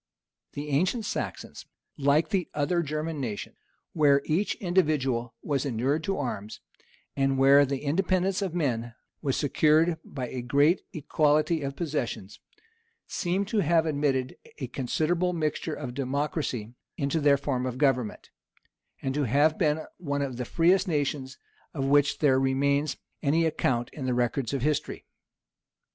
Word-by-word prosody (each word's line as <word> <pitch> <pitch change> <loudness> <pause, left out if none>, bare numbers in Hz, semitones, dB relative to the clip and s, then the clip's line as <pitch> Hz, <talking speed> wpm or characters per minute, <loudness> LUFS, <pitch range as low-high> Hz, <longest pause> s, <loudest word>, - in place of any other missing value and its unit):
The 145 +1 -5
ancient 185 - +1
Saxons, - - -5 0.3
like 145 +2 +2
the 190 -6 -1
other 160 +4 +1
German 155 0 -3
nations, 110 -5 -5 0.4
where 140 -3 +4
each 185 +6 0
individual 145 - 0
was 140 -3 0
inured 140 +4 0
to 195 - -1
arms, 110 -6 -4 0.6
and 135 -1 +1
where 140 +1 +6
the 135 0 -3
independence 185 +5 +1
of 185 -4 -2
men 120 -7 -1 0.3
was 135 -4 0
secured 155 +3 +3
by 130 -3 -5
a 125 - -4
great 145 +8 +3
equality 155 0 +1
of 140 -1 -4
possessions, 135 - -4 0.7
seem 185 +3 -1
to 210 +2 0
have 165 -2 +3
admitted 140 -4 0 0.2
a 135 - -4
considerable 160 +8 0
mixture 155 -1 -2
of 130 -4 -6
democracy 135 -3 -2 0.2
into 140 +3 0
their 145 -2 +4
form 130 -2 -2
of 125 0 -4
government, 130 -6 0 0.7
and 135 - -1
to 145 0 0
have 145 +6 +3
been 155 -1 +1
one 145 -4 -2
of 130 -3 -4
the 125 - -3
freest 180 - +3
nations 145 -4 -2 0.4
of 135 -2 -1
which 140 +1 +3
there 135 -3 +3
remains 140 +2 +1 0.2
any 160 +3 +2
account 120 -6 0
in 135 -4 -5
the 125 - +1
records 120 0 0
of 135 -3 -2
history. 150 -1 -1
145 Hz, 145 wpm, -27 LUFS, 130-160 Hz, 0.7 s, where